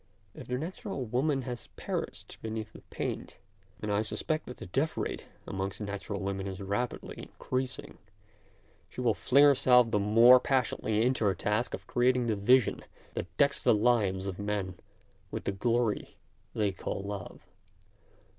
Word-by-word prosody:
If - - -10
the 125 - -1
natural 170 - -4
woman 135 +4 0
has 120 -2 -6
perished - - -5
beneath 110 -1 -5
the - - -12
paint, - - -4 0.4
and 105 -1 -2
I 100 - +2
suspect 155 +7 -2
that 125 - -8
the - - -8
death 135 - -1
rate - - -3 0.2
amongst 95 0 -4
natural 100 -1 -4
women 95 0 -2
is 95 0 -5
rapidly 100 +5 -4
increas 130 0 -2
ing, - - -11 0.9
she - - -10
will 120 -3 +3
fling 140 +6 +4
herself 125 -4 +6
the 105 - +2
more 115 +5 +7
passion 130 -2 0
ately 110 0 +1
into 125 -1 +1
her 95 -2 +3
task 105 +4 0
of - - -13
creating 125 0 +2
the 110 -2 +1
vision 125 +4 +3 0.3
that 90 +1 -6
decks 140 0 +3
the - - +4
lives 105 -4 +2
of 95 -1 -4
men 100 -2 -2 0.6
with - - -5
the - - -1
glory 115 +2 0 0.4
they 105 -2 +1
call 95 +1 -4
love. 100 -2 -7
110 Hz, 165 wpm, -30 LUFS, 100-125 Hz, 0.9 s, more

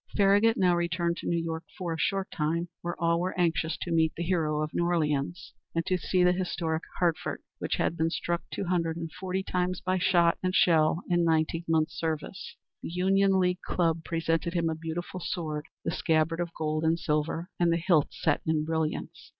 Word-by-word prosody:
Farragut 205 +3 +4
now 180 -2 +4
returned 170 0 0
to - - -6
New 170 - +1
York 165 0 -3
for 175 -3 -2
a 160 - -5
short 195 +3 0
time, 165 +2 -1
where 175 -1 -4
all 170 0 +2
were 180 +1 -2
anxious 165 -2 +1
to 175 - -3
meet 160 -1 +3
the 170 - -2
Hero 155 -4 0
of 155 - -5
New - - +1
Orleans, 165 -1 -1 0.2
and 165 0 0
to 185 - +1
see 180 +1 +1
the 180 - +5
historic 170 -3 -1 0.2
Hartford, 170 -3 0 0.2
which - - -1
had - - 0
been 160 0 +2
struck 170 0 -2
two - - -3
hundred 170 -2 0
and 165 -1 -5
forty 190 +2 -3
times 180 -1 -1
by 185 0 0
shot 175 -2 +3
and 185 0 -1
shell 165 0 +4
in 175 -1 +2
nineteen 165 +1 +1
months' 155 -1 +1
service. 160 +4 -4 0.3
The - - -5
Union 190 +2 +3
League 180 0 +1
Club 165 -2 0
presented 165 +1 -1
him 165 -1 +1
a - - -1
beautiful 165 +3 -5
sword, 155 -3 -3 0.2
the 165 - 0
scabbard 160 0 +1
of 175 -1 -1
gold 155 0 -1
and 160 +1 +3
silver, 165 +3 -1
and 175 -1 +3
the 165 - +2
hilt 170 -4 +3
set 145 - 0
in 155 -1 +1
brilliants. 160 -1 -3
170 Hz, 200 wpm, -28 LUFS, 160-180 Hz, 0.3 s, the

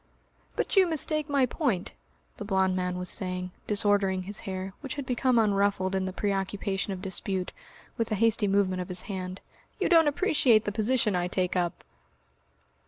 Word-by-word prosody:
"But - - -1
you 380 -2 +6
mistake 305 -1 0
my 280 -2 +3
point," 245 - -1 0.5
the 210 - -6
blond 190 -2 +1
man 180 -1 -2
was 180 0 -3
saying, 180 -1 0 0.2
disordering 200 -2 +2
his 205 +3 -5
hair 190 0 -4
which 295 0 -5
had 285 -2 -5
become 250 0 +1
unruffled 200 -3 +2
in 190 -1 0
the 185 - -3
preoccupation 195 0 -2
of 190 -1 -6
dispute 190 -1 -2 0.4
with 230 -1 -2
a - - +2
hasty 225 0 +2
movement 195 -2 +1
of 180 - -7
his 180 0 -3
hand, 185 -2 -6 0.4
"you - - +1
don't 330 -3 +6
appreciate 285 - +3
the 205 - -1
position 220 -1 +1
I 175 0 0
take 180 0 -1
up.") 175 -2 -1
200 Hz, 170 wpm, -28 LUFS, 185-230 Hz, 0.5 s, you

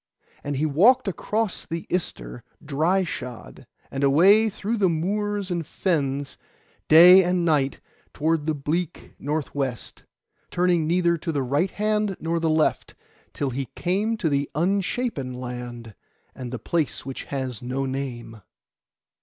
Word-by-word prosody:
And 145 0 -3
he 150 - +1
walked 215 - +4
across 210 +3 -2
the 165 0 -5
Ister - - -4 0.2
dry 160 +7 +1
shod, 125 -8 -8 0.2
and 135 +1 -3
away 190 +11 +5
through 215 +2 -3
the 195 -3 +3
moors 200 +4 -1
and 170 -1 -1
fens, 145 -5 -2 0.5
day 180 +4 +9
and 180 -1 +1
night 145 -4 +1 0.3
toward 160 0 0
the 155 - +1
bleak 155 +4 -3
north 150 +1 -3
west, 135 -4 -4 0.4
turning 175 -3 +1
neither 170 0 +2
to 165 - -3
the 140 -3 -1
right 145 +9 +1
hand 210 -1 0
nor 165 +1 -1
the 165 -1 0
left, 155 0 +1 0.4
till 140 -2 -2
he 135 +2 -3
came 205 +6 0
to 195 - -1
the 140 -1 0
Unshapen 185 - -1
Land, 120 -2 -7 0.4
and 125 -2 -7
the 125 - -3
place 155 +6 -2
which 135 -1 -6
has 130 -5 -4
no 130 +2 -2
name. 125 -5 -5
160 Hz, 145 wpm, -24 LUFS, 135-185 Hz, 0.5 s, day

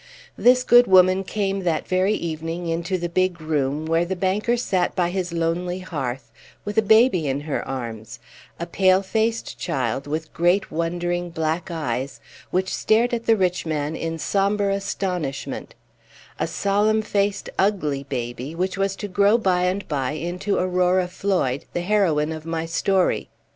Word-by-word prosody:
This 250 +1 +4
good 245 0 +6
woman 185 0 +5
came 195 0 -2
that 170 -4 -1
very 185 +3 +2
evening 165 0 -4
into 170 +3 -1
the 175 -1 -2
big 180 0 0
room, 150 -1 -1
where 165 +1 +2
the 185 +2 -3
banker 200 +6 0
sat 185 -7 0
by 175 -1 +1
his 180 -2 -2
lonely 170 +2 -1
hearth, 135 -9 -5 0.3
with 205 0 -4
a - - +5
baby 220 - +4
in 135 +1 -1
her 150 -1 -3
arms 115 -4 -6 0.4
a 170 - -2
pale 185 +2 +3
faced 225 +3 -1
child, 135 -3 -2
with 155 +2 -4
great 175 +4 +2
wondering 175 +2 -2
black 160 +2 -2
eyes, 135 -5 -3 0.3
which 185 +1 -1
stared 235 +3 +2
at 230 -1 -2
the 225 -1 +5
rich 180 -2 +1
man 150 0 -2
in 165 0 -3
sombre 200 +3 +1
astonishment; 180 -7 -3 0.6
a - - 0
solemn 210 +2 +1
faced, 200 -1 -1
ugly 155 -9 +1
baby, 125 +2 -5
which 185 +3 -2
was 195 0 0
to 205 - -5
grow 200 +3 +3
by 185 -5 +1
and 190 +2 -1
by 140 -2 -1
into 175 +5 -2
Aurora 180 0 +2
Floyd, 180 -8 -1
the 175 - -1
heroine 175 -6 +2
of 160 -1 -6
my 165 0 -3
story. 185 +3 +1
180 Hz, 160 wpm, -23 LUFS, 160-195 Hz, 0.6 s, good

